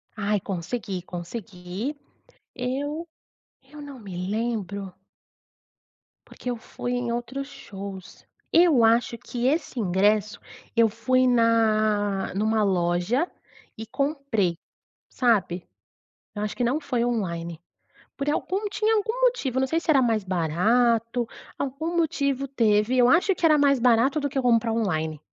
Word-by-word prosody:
Ai, 205 -1 0
consegui, 195 +1 -4
consegui. 180 - -6 0.6
Eu 285 +6 -3 0.5
eu 295 +3 -12
não 280 -3 -10
me 185 -2 -5
lembro 205 -4 -3 1.4
porque 250 - -7
eu 245 - -2
fui 245 +2 -5
em 245 -1 -1
outros 240 +4 -4
shows. 200 -9 -9 0.3
Eu 330 -8 +5
acho 230 +1 +3
que 245 +1 -3
esse 295 -2 -1
ingresso, 205 +2 +2 0.4
eu 230 -1 +5
fui 255 +4 +2
na 215 -4 +2
numa 215 +2 +1
loja, 185 - +1 0.5
e 220 - -6
comprei, 275 - -1 0.5
sabe? 195 -8 +1 0.7
Eu 205 - -4
acho 210 - -3
que 245 - 0
não 260 +6 +1
foi 250 -5 -1
online. 170 -8 -2 0.6
Por 280 +1 -1
algum 380 +7 -1
tinha 435 +2 +1
algum 445 +4 -1
motivo. 475 - +1
Eu - - +3
não 265 - +1
sei 325 +4 +1
se 335 - -11
era 275 -3 +5
mais 225 -4 +1
barato, 225 +7 +1 0.3
algum 315 +6 -3
motivo 280 -4 0
teve. 225 -2 +2
Eu 245 -1 +5
acho 360 +6 +4
que 340 - 0
era 310 -2 +6
mais 280 -2 +4
barato 250 +4 +3
do 285 -1 -1
que 270 0 -1
comprar 235 -2 +3
online. 160 -9 -1
235 Hz, 135 wpm, -25 LUFS, 205-275 Hz, 1.4 s, era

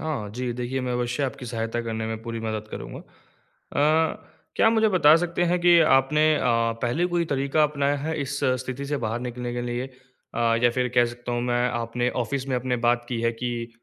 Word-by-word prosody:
हाँ 145 -10 -3
जी, 125 0 -2
देखिए, 125 +2 -3
मैं 125 -1 -2
अवश्य 125 +3 -1
आपकी 130 -2 -4
सहायता 115 0 -3
करने 110 -1 -3
में 110 0 -5
पूरी 115 0 -5
मदद 110 -1 -4
करूँगा। - - -7
अ, 155 +3 -2 0.3
क्या - - +4
आप 225 - +5
मुझे 220 -1 +3
बता 170 -6 +6
सकते 175 +1 -1
हैं 175 +1 +1
कि 175 -1 +6
आपने 150 +1 +4
अ, - - -1 0.4
पहले 125 +9 +1
कोई 175 -1 0
तरीका 140 +3 +1
अपनाया 145 -1 +1
है 155 +3 -3
इस 140 0 -4 0.2
स्थिति 130 +2 -5
से 145 - -1
बाहर 115 +2 -2
निकलने 125 0 -5
के 120 - -3
लिए? 120 +1 -3 0.5
अ, - - -3 0.2
या 120 - +5
फिर 125 +1 0
कह 120 -1 +5
सकता 120 +1 -6
हूँ 120 - 0
मैं 120 0 +1
आपने 120 +1 -1 0.2
ऑफ़िस 135 +1 -3
में 130 - 0
अपने 125 0 -1
बात 120 0 +2
की 120 -2 -2
है, 115 0 +1
कि 120 0 -4
125 Hz, 215 wpm, -25 LUFS, 120-145 Hz, 0.5 s, बता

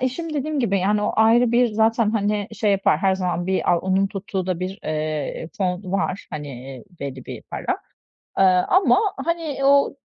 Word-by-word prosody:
eşim 305 +5 -3
dediğim 295 0 -1
gibi 200 -5 +1
yani 205 +3 +1
o - - 0
ayrı 230 +2 +4
bir 245 +1 +4
zaten, 220 0 +2
hani, 205 -2 -1
şey 215 -2 0
yapar; 195 -5 +2
her 190 +1 +2
zaman 180 -1 -2
bir 190 0 +1
a 170 - +3
onun 190 +1 +1
tuttuğu 195 -1 -4
da 180 -1 -2
bir, 190 +3 -4
eee, 155 +1 -3
fon 185 0 -2
var, 195 0 -1
hani, 150 -2 -6
eee, 130 +3 -9 0.2
belli 135 -2 -6
bir - - -7
para, - - -3 0.6
aaa, 185 -1 +4
ama 375 +1 +4 0.3
hani 330 -4 -2
o 280 0 +4
195 Hz, 185 wpm, -22 LUFS, 180-230 Hz, 0.6 s, ayrı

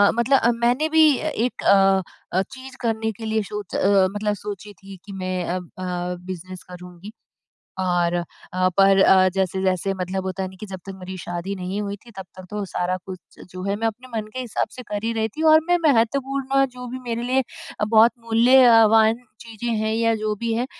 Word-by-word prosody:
मतलब 250 +3 +3
अ, 235 - +3
मैंने 250 +6 +2
भी 310 -3 +5
अ, - - -3
एक 245 -3 -2
अ 195 -1 +5 0.4
अ, - - +4
चीज़ 265 0 -10
करने 220 -2 -1
के 225 +2 -9
लिए 220 0 0
सोच 210 -1 -7
अ, 195 -1 +4
मतलब 210 0 0
सोची 205 0 -8
थी 195 0 -13
कि 200 - -10
मैं 185 -1 -3
अ 175 - -2
अ, 180 0 -5
बिज़नेस 185 0 -8
करूँगी। 180 +2 -11 0.7
और 175 -2 +1 0.4
अ, 185 0 +2
पर 195 0 +5
अ, 185 0 +6
जैसे-जैसे 190 0 0
मतलब 190 0 -4
होता 190 0 -3
है 185 - -4
ना 190 - -14
कि 215 - -6
जब 190 -2 -8
तक 195 - -7
मेरी 185 +1 -7
शादी 175 +2 -5
नहीं 185 +2 -4
हुई 200 -1 -4
थी 235 - -14
तब 190 - -6
तक 185 - -10
तो 210 0 -4
सारा 185 0 -2
कुछ 185 -2 -11
जो 185 0 -7
है 200 +1 -1
मैं 225 +2 -1
अपने 235 +4 -6
मन 215 -1 -4
के 255 - -4
हिसाब 245 -4 -2
से 250 - -8
कर 205 0 -4
ही 230 - 0
रही 220 -1 0
थी 315 - -2
और 315 - +8
मैं 355 0 +4
महत्वपूर्ण 270 +2 +2
जो 250 0 -9
भी 255 +2 -6
मेरे 230 +1 -2
लिए 260 +2 +1 0.4
अ, - - +2
बहुत 220 +2 +5
मूल्यवान 230 -1 +5 0.2
चीज़ें 230 +1 -6
हैं 220 0 -1
या 230 0 +2
जो 215 0 -2
भी 235 -1 -1
है, 235 +2 0
210 Hz, 210 wpm, -22 LUFS, 185-235 Hz, 0.7 s, और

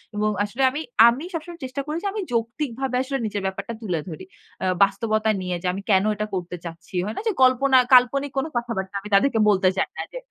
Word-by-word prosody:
এবং 210 0 +1
আসলে 230 +6 -4
আমি 295 +4 -4 0.3
আমি 250 +6 +1
সবসময় 335 +1 -6
চেষ্টা 260 +2 -4
করি 305 +2 -3
যে - - 0
আমি 425 - -3
যৌক্তিকভাবে 245 +2 -2
আসলে 270 +1 -2
নিজের 205 -1 -3
ব্যাপারটা 200 +4 -4
তুলে 180 -7 -2
ধরি। 165 +4 -8 0.4
অ্যা 190 - -1 0.2
বাস্তবতা 215 +2 +1
নিয়ে 180 -1 -2
যে - - -1
আমি 195 - -5
কেনো 195 +1 +4
এটা 210 +1 -3
করতে 180 -1 -4
চাচ্ছি। 170 +3 -9
হয় 215 - -4
না - - -2
যে - - +3
কল্পনা 260 +1 +4 0.2
কাল্পনিক 265 +3 +5
কোনো 310 +4 0
কথাবার্তা। 215 -5 -3
আমি 210 - -9
তাদেরকে 225 +2 +3
বলতে 190 -2 +4
চাই - - 0
না, - - -2
যে - - -5
225 Hz, 215 wpm, -23 LUFS, 195-270 Hz, 0.4 s, কাল্পনিক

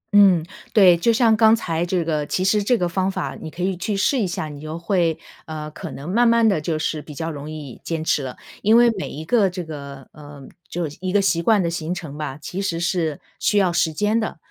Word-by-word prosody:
嗯， 190 -5 +6 0.3
对， 190 -5 +7
就 175 +8 +2
像 225 -1 +4
刚 220 +1 +6
才 170 -7 -2
这 175 -1 0
个 155 -2 -1
其 185 - -1
实 210 +2 +3
这 245 +4 +2
个 180 - 0
方 185 +2 0
法 145 -7 -3
你 160 - -6
可 175 +3 -6
以 190 0 0
去 195 +4 -2
试 230 +7 +2
一 205 - +1
下， 175 -3 -3
你 145 -1 -9
就 155 +1 -6
会， 170 -2 +1 0.3
呃 155 -1 -6
可 165 +2 -7
能 140 +1 -8
慢 235 +7 +3
慢 230 -1 +4
地 195 -8 +2
就 155 +1 -1
是 155 0 -2
比 150 -1 -11
较 165 +3 -3
容 145 0 -7
易 150 -5 -8
坚 165 -2 -3
持 155 - +1
了。 130 -2 -6 0.2
因 220 +3 +5
为 240 0 +6
每 195 -4 -5
一 155 +3 -7
个 210 -1 +3
这 180 0 -5
个， 140 -4 -9
呃 145 -2 -12 0.2
就 175 -1 -2
是 150 - -11
一 185 -1 -2
个 205 - +3
习 190 -4 +1
惯 205 +2 +3
的 - - 0
形 170 +1 -3
成 155 -5 -7
吧， 150 -3 -5
其 180 +5 -5
实 170 -4 -2
是 165 -3 -1 0.2
需 210 - +1
要 185 -3 +3
时 170 -1 +2
间 210 +7 +1
的， 220 -6 -3
170 Hz, 270 characters per minute, -22 LUFS, 155-200 Hz, 0.3 s, 对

